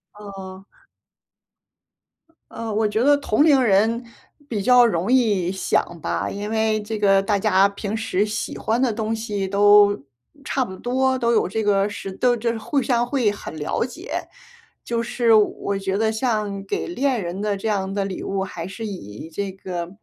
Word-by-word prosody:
哦。 195 -2 -10 1.9
呃， 230 -1 -5
我 215 0 +2
觉 215 +2 -1
得 290 +1 +5
同 285 -1 +2
龄 285 -4 +5
人 225 +2 +2 0.4
比 215 -6 -2
较 250 +2 +6
容 195 -1 0
易 210 -9 +2
想 190 -3 -1
吧， - - -2
因 205 +1 -5
为 220 -1 +1
这 215 0 -5
个 195 -1 +4
大 200 0 +1
家 195 -1 +4
平 200 +1 -4
时 215 -3 0
喜 210 0 -4
欢 230 +3 0
的 245 -4 +2
东 220 0 -2
西 210 -3 -3
都 205 -3 +5 0.4
差 270 - 0
不 190 -6 -7
多， 260 +4 0
都 235 -2 +1
有 220 - +2
这 220 +4 -2
个 200 -1 +2
时 205 -1 -6
都 245 +5 +1
就 235 +1 0
是 230 - -4
互 265 +6 -1
相 240 -2 +1
会 245 -5 +1
很 205 -5 -8
了 150 +7 -1
解。 340 - -6 0.6
就 235 -1 -1
是 230 0 +2
我 205 -2 +2
觉 195 0 -1
得 220 +1 +1
像 215 -4 -1
给 - - -3
恋 270 - 0
人 175 +3 -4
的 210 -1 0
这 200 +3 -3
样 195 -2 -1
的 200 - 0
礼 195 -2 -5
物， 195 0 -2
还 175 -3 -6
是 220 +4 -7
以 160 - -8
这 195 +4 -4
个 180 -2 -5
210 Hz, 195 characters per minute, -22 LUFS, 195-230 Hz, 1.9 s, 较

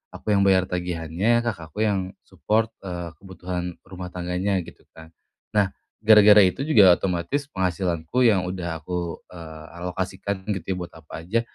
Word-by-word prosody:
Aku 105 - -3
yang 100 - +3
bayar 95 -1 +4
tagihannya, 90 +6 0
kakak 85 -9 -4
aku 110 - -1
yang 95 -3 0 0.2
support, 110 +1 0
eee, 85 -3 -5
kebutuhan 90 -2 -5
rumah 90 -1 -8
tangganya 90 +2 -1
gitu - - -15
kan. 80 0 -13 0.4
Nah 105 -2 +3 0.3
gara-gara 105 -1 +8
itu 95 +8 -1
juga 105 - +6
otomatis 95 - -2
penghasilanku 90 - -1
yang 100 -6 +4
udah 85 -3 -4
aku, 85 0 -4
eee, 80 -3 -10 0.2
alokasikan 95 +2 -4
gitu 95 -5 -2
ya, - - -5
buat 85 - -8
apa 80 0 -9
aja, 115 +6 +1
90 Hz, 155 wpm, -24 LUFS, 85-100 Hz, 0.4 s, gara-gara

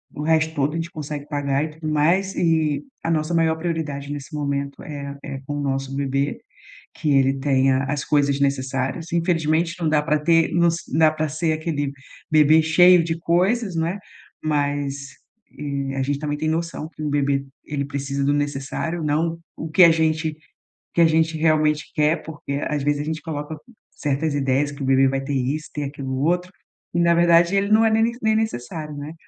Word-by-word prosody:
o 150 - -5
resto 160 0 +2
todo 145 +1 0
a - - -4
gente 165 0 -3
consegue 150 -2 -6
pagar 145 -1 0
e 155 - -3
tudo 155 +1 -8
mais, 175 +6 +2
e 160 -3 +1 0.2
a - - -1
nossa 160 0 0
maior 165 -1 +2
prioridade 155 -4 -3
nesse 145 +2 -7
momento 140 -1 -3
é 140 -2 -7
é 135 -1 -6
com 145 +1 -4
o - - -2
nosso 135 -1 -2
bebê, 140 0 -1 0.5
que 150 - -2
ele 135 0 +3
tenha 135 -1 +2
as 140 +1 -2
coisas 145 -1 +1
necessárias. 135 +4 -1
Infelizmente 165 -1 +1
não 165 - +1
dá 150 -1 +3
pra 150 0 +1
ter 165 +2 +3
nos 170 -1 +3 0.2
dá 155 +1 +5
pra 155 0 -2
ser 155 +2 -1
aquele 155 -3 -2 0.4
bebê 155 +1 +5
cheio 175 +2 +6
de 165 0 -2
coisas, 185 +4 +1
não 160 0 +1
é, 180 +4 -3 0.4
mas, 145 -2 -2 0.4
eh, 140 -2 -3
a 135 - 0
gente 140 +1 -1
também 150 -1 -2
tem 155 +1 -1
noção 165 -1 -2
que 155 - -10
um 150 - -1
bebê 140 -1 +1 0.2
ele 145 -1 -3
precisa 140 0 -3
do 145 - +2
necessário, 145 +4 -2
não 165 +3 0 0.2
o 160 - -5
que 180 +3 +7
a 170 - +8
gente 160 0 +1 0.6
o - - -62
que - - +2
a 165 - +7
gente 160 0 +2
realmente 155 -1 +1
quer 155 +2 +2
porque 150 -3 -6
às 150 -2 -1
vezes 145 +1 0
a - - -5
gente 160 +1 -3
coloca 155 -1 -5 0.3
certas 145 +1 -2
ideias 140 +1 +1
que 145 0 -8
o - - -2
bebê 135 0 +4
vai 135 0 -1
ter 135 +2 -4
isso, 140 +4 -2
ter 150 - -4
aquilo 135 -2 -5
outro, 180 +3 +1 0.4
e 170 - +2
na 170 0 +4
verdade 170 +1 +4
ele 200 +1 +1
não 220 +1 +5
é 225 - +4
ne 225 +2 +2
nem 220 0 +3
necessário, 155 - -3
né? 145 +2 -6
150 Hz, 200 wpm, -22 LUFS, 140-165 Hz, 0.6 s, a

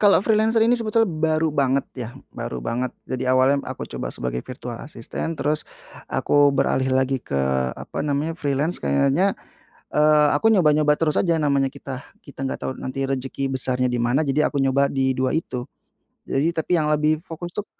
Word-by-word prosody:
Kalau 205 -2 +6
freelancer 220 +2 +2
ini 230 +2 +4
sebetulnya 225 -1 +1
baru 160 -2 0
banget 140 -1 +1
ya, 125 -4 -5 0.3
baru 65 - -4
banget, 120 - -2 0.2
jadi 130 0 -1
awalnya 130 +2 +3
aku - - -6
coba - - -5
sebagai 60 0 -4
virtual 125 -1 -7
asisstant, 150 +4 -5
terus 150 +1 0 0.5
aku 145 0 +3
beralih 130 -1 +1
lagi 130 0 +1
ke, 70 - -2 0.4
apa - - -5
namanya, 150 +2 -1
freelance, 145 +2 -1
kayaknya, 140 - +2 0.5
eee, 150 0 +4
aku 225 +8 +3
nyoba-nyoba 150 -6 +3
terus 155 -2 +1
aja, 165 -3 +2
namanya 140 -2 +1
kita 135 -2 -7 0.2
kita 135 -1 -8
nggak 130 - -3
tahu - - -3
nanti 135 +1 -3
rezeki 135 0 -2
besarnya 130 0 0
dimana. 120 +2 +1
Jadi 150 0 +1
aku 140 - 0
nyoba 135 +1 +2
di 130 -1 +1
2 130 -1 0
itu. 130 -6 -2 0.6
Jadi 145 +5 +1
tapi 165 0 -3
yang 150 - 0
lebih 150 +1 +2
fokus 175 0 -8
tuh 210 - -4
140 Hz, 170 wpm, -23 LUFS, 130-160 Hz, 0.6 s, Kalau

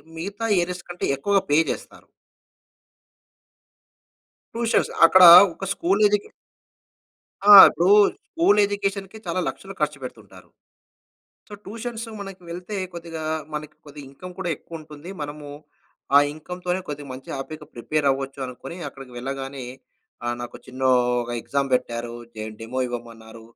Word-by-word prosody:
మిగతా 200 +7 -5 0.2
ఏరియాస్ 180 0 -4
కంటే, 175 - -4
ఎక్కువగా 200 +8 +1
పే 145 +2 +4
చేస్తారు. - - -9 2.5
ట్యూషన్స్ 230 -1 +1
అక్కడ 185 +2 +6 0.3
ఒక 195 - -7
స్కూల్ 190 +4 0
ఎడ్యుకే 205 0 -1 1.2
ఆ! - - +11 0.2
ఇప్పుడు 170 - -1 0.4
స్కూల్ 330 - +2
ఎడ్యుకేషన్‌కే 200 0 -3
చాలా 170 +2 -1
లక్షలు 165 +9 -6
ఖర్చు 150 -1 0
పెడుతుంటారు. 125 - -11 1.0
సో, - - -15
ట్యూషన్స్‌కి 225 +2 -7
మనకి 195 -2 -9
వెళ్తే 180 +4 -6 0.2
కొద్దిగా 165 -1 -7 0.3
మనకి 150 0 -6 0.3
ఇన్‌కమ్ 180 +7 -11
కూడా 180 -2 -2
ఎక్కువుంటుంది. 155 0 -11
మనము 145 0 -7 0.7
ఆ - - +10
ఇన్‌కమ్‌తోనే 180 +4 -4
కొద్దిగా 145 -1 -6
మంచిగా, 130 +1 -7
హ్యాపీగా 150 +2 -8
ప్రిపేర్ 145 +5 -2
అవ్వొచ్చు 135 0 -4
అనుకోని 130 +7 -9
అక్కడికి 135 -2 -13
వెళ్ళగానే 135 +1 -6 0.6
ఆహ్, 120 - -1
నాకో 120 0 -7
చిన్నో 130 0 0 0.3
ఒగ 120 - -8
ఎక్సామ్ 140 +2 -2
పెట్టారు. 120 -1 -3 0.2
జేం 110 0 -6
డెమో 115 +3 -5
ఇవ్వమన్నారు. 115 -2 -9
155 Hz, 120 wpm, -23 LUFS, 135-190 Hz, 2.5 s, ఆ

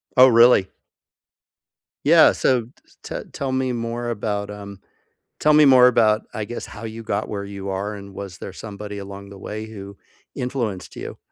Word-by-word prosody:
Oh, 130 0 +9
really? 115 -5 +6 1.4
Yeah, - - +7
so 125 -3 +2
t 115 - -16 0.3
t - - -5
tell 135 -2 -3
me 130 -1 0
more 120 0 -3
about, 105 -2 -3
um, 100 -1 -9 0.6
tell 150 - +4
me 150 0 +7
more 130 -3 +7
about, 110 -3 +4
I 105 - -3
guess, 120 +3 -6
how 105 - -11
you 115 0 -7
got 105 0 -2
where 100 -1 -4
you 100 -1 -7
are, 100 +2 -3
and 100 -1 -10
was 95 -2 -8
there 95 - -7
somebody 105 0 -8
along 100 0 -9
the 100 - -11
way 110 +2 -6
who 100 -2 -10 0.4
influenced 120 -7 -4
you? - - -7
105 Hz, 175 wpm, -22 LUFS, 100-120 Hz, 1.4 s, Oh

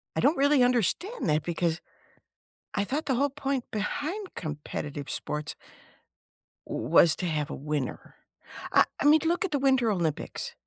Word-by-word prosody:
I - - 0
don't 295 +2 +3
really 280 -1 +4
understand 250 - +1
that 150 0 +2
because 170 -1 -1 1.0
I 200 - +1
thought 295 +8 -2
the 265 - +1
whole 280 +3 +2
point 275 -2 -2
behind 315 - -3
competitive 150 -2 -5
sports 150 +1 -3 1.1
w - - -3
was 160 -2 +6
to 180 - -4
have 155 -4 -1
a - - -4
winner. 145 -2 -4 0.6
I - - +6 0.2
I - - 0
mean 300 +1 +6
look 345 +4 +1
at - - -2
the 290 - +2
Winter 265 -4 +3
Olympics. 170 -6 -2
240 Hz, 155 wpm, -28 LUFS, -, 1.1 s, was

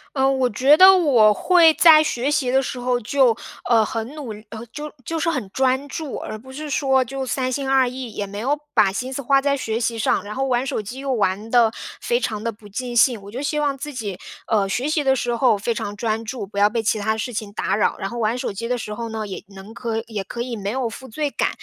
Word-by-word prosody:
呃， 265 0 +3
我 260 -2 +1
觉 265 +7 +5
得 375 +4 +9
我 245 -11 +5
会 340 - +5
在 310 -2 +7
学 270 0 -1
习 270 -4 +1
的 265 +1 +3
时 255 - -5
候， 245 0 0
就， 245 0 +2 0.3
呃， 225 -2 +5
很 225 +1 -4
努 275 -7 -6 0.2
呃 230 +1 -8
就 300 +1 -7
就 330 -1 -2
是 335 - +1
很 255 -10 -2
专 265 +2 +1
注， 305 -1 -5
而 215 - -6
不 260 +3 -13
是 300 +3 -6
说 265 -2 +2
就 270 +2 -5
三 255 0 -1
心 270 0 -2
二 265 -2 +4
意， 250 -2 -6
也 205 - -4
没 200 +1 -7
有 280 +6 0 0.2
把 195 -2 +4
心 255 +6 -4
思 280 - -3
花 275 +2 +3
在 280 0 +1
学 225 -4 -2
习 230 -1 -1
上， 205 - +1
然 210 +1 -7
后 270 +1 -1
玩 250 0 0
手 220 - -2
机 225 +6 -8
又 275 -1 -2
玩 205 0 -1
得 235 -3 +5 0.3
非 480 0 +1
常 215 - -3
地 230 - -1
不 210 0 -16
尽 240 +4 -5
兴。 235 -3 +4
我 200 - -11
就 245 +5 -6
希 300 +1 -1
望 285 -2 0
自 295 +1 -6
己， 205 -7 -5 0.3
呃， 205 -3 +2
学 250 +8 -1
习 305 -1 +1
的 265 -1 +3
时 240 -1 -1
候 245 -3 +3
非 230 +3 -1
常 205 -1 -4
专 225 0 -2
注， 220 -2 -5
不 200 0 -11
要 205 +1 +5
被 230 -1 0
其 220 0 +1
它 220 +1 0
事 235 +3 -4
情 210 -2 -5
打 195 -2 -1
扰。 210 - +1
然 195 - -3
后 240 - -7
玩 225 +1 0
手 250 - -3
机 230 +4 -5
的 250 -1 -1
时 210 - -5
候 230 -1 -5
呢， 220 -1 -4
也 190 - -7
能 195 +3 -12
可 225 -2 -3
也 210 -4 -4
可 235 +4 -6
以 240 -1 -4
没 200 -1 -3
有 255 -2 -1
负 260 +4 -10
罪 290 +5 -2
感， - - 0
245 Hz, 285 characters per minute, -22 LUFS, 220-270 Hz, 0.3 s, 得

